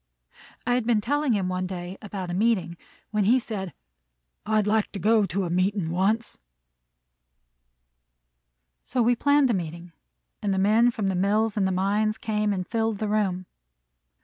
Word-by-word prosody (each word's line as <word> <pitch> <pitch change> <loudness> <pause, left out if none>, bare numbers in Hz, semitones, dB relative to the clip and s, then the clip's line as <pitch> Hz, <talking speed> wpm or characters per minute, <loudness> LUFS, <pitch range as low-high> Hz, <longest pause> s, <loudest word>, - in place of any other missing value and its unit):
I 245 - +1
had 245 -2 0
been 230 -3 +3
telling 285 +4 0
him 195 -3 0
one 185 0 -2
day 180 0 -6
about 195 -4 -5
a - - -3
meeting, 190 -3 +1 0.4
when 210 -2 +1
he 240 +6 +5
said, 205 -7 -4 0.8
"I'd 215 -1 +2
like 215 0 +1
to 200 - -4
go 215 +2 +3
to 195 +2 -2
a 175 - -3
meetin' 185 -1 0
once." 205 +6 0 2.4
So 250 -2 -1
we 240 +2 +3
planned 285 0 +3
a - - +1
meeting, 170 -1 -5 0.5
and 200 -2 0
the - - -2
men 215 +5 +4
from 220 -4 -3
the - - 0
mills 205 +4 +1
and 200 -3 +1
the - - 0
mines 205 +3 0
came 210 -1 -1
and 185 -2 -2
filled 225 -2 -1
the 215 +1 -2
room. 195 -4 0
210 Hz, 170 wpm, -25 LUFS, 185-225 Hz, 2.4 s, he